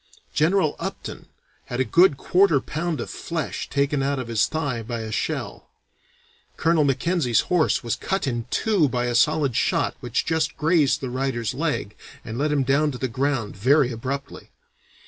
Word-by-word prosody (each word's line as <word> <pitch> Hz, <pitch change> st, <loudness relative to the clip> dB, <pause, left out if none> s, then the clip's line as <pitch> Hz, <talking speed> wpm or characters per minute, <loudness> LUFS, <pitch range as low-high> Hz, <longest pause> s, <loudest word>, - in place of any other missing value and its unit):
General 160 Hz, 0 st, +2 dB
Upton -, -, -6 dB, 0.4 s
had 120 Hz, -, -5 dB
a 130 Hz, -, +2 dB
good 170 Hz, -, +4 dB
quarter 180 Hz, -1 st, +3 dB
pound 160 Hz, +4 st, -3 dB
of -, -, -4 dB
flesh 165 Hz, -4 st, -4 dB
taken 140 Hz, 0 st, +1 dB
out 140 Hz, +1 st, 0 dB
of 125 Hz, -3 st, -5 dB
his 110 Hz, -3 st, +2 dB
thigh 145 Hz, -7 st, -2 dB
by 115 Hz, +1 st, -4 dB
a 110 Hz, -1 st, -6 dB
shell. -, -, -3 dB, 0.9 s
Colonel 165 Hz, -1 st, +3 dB
Mackenzie's 140 Hz, -2 st, +1 dB
horse 175 Hz, -6 st, +1 dB
was 115 Hz, -, -1 dB
cut 195 Hz, -2 st, -2 dB
in 120 Hz, -3 st, -3 dB
two 195 Hz, -, +2 dB
by 125 Hz, -1 st, -1 dB
a 120 Hz, -, -1 dB
solid 145 Hz, 0 st, +2 dB
shot -, -, +1 dB
which 120 Hz, 0 st, -2 dB
just 160 Hz, -1 st, 0 dB
grazed 155 Hz, -3 st, +2 dB
the 130 Hz, -2 st, -4 dB
rider's 130 Hz, -3 st, -2 dB
leg 140 Hz, -8 st, -2 dB, 0.3 s
and 115 Hz, +2 st, -5 dB
let 150 Hz, +1 st, +1 dB
him 145 Hz, -2 st, +2 dB
down 140 Hz, +3 st, +2 dB
to 130 Hz, -, -5 dB
the 130 Hz, -, -2 dB
ground 130 Hz, -3 st, -1 dB
very 130 Hz, +5 st, +3 dB
abruptly. 135 Hz, +4 st, -5 dB
140 Hz, 170 wpm, -24 LUFS, 120-155 Hz, 0.9 s, good